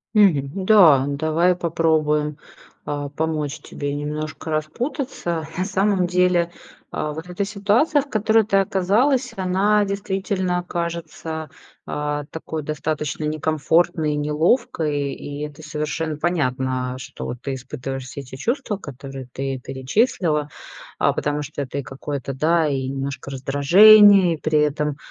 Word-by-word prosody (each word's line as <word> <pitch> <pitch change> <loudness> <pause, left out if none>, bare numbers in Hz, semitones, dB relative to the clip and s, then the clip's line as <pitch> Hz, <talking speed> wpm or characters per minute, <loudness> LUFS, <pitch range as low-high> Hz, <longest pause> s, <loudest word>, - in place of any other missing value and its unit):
Мгм, 185 -3 +3
да, 165 -11 +7
давай 160 +5 +2
попробуем, 155 -3 +1 0.5
а, 145 -1 -3
помочь 155 -1 -2
тебе 145 0 -5
немножко 150 +2 -4
распутаться. 170 - -3
На 185 - 0
самом 195 -2 +1
деле, 180 -1 +2 0.4
а, 150 - -2
вот 160 +4 -8
эта 180 +3 -2
ситуация, 210 +9 +2
в 280 - -12
которой 220 0 +3
ты 200 - 0
оказалась, 225 +7 +2
она 195 +3 +2
действительно 190 -2 -2
кажется, 165 -2 -4 0.4
а, 150 0 -2
такой 160 -1 -5
достаточно 150 0 -3
некомфортной, 155 0 +1
неловкой. 150 - 0
И 145 0 -7
это 150 +1 -8
совершенно 150 +1 -3
понятно, 130 -6 -1
что 125 -1 -6
ты 135 +2 -5
испытываешь 135 0 -6
все 140 +2 -7
те 130 +1 -10
чувства, 240 - -2
которые 135 -4 -9
ты 135 -1 -3
перечислила, 150 - 0 0.5
а, - - +3
потому 150 0 -1
что 145 0 -6
это 140 0 -5
и - - -4
какое-то, 135 +1 -5
да, 160 +4 +2
и 135 -2 -1
немножко 135 +1 -4
раздражение, 185 +8 +7
и - - -10
при 155 -1 +1
этом, 150 0 0
155 Hz, 130 wpm, -22 LUFS, 145-185 Hz, 0.5 s, да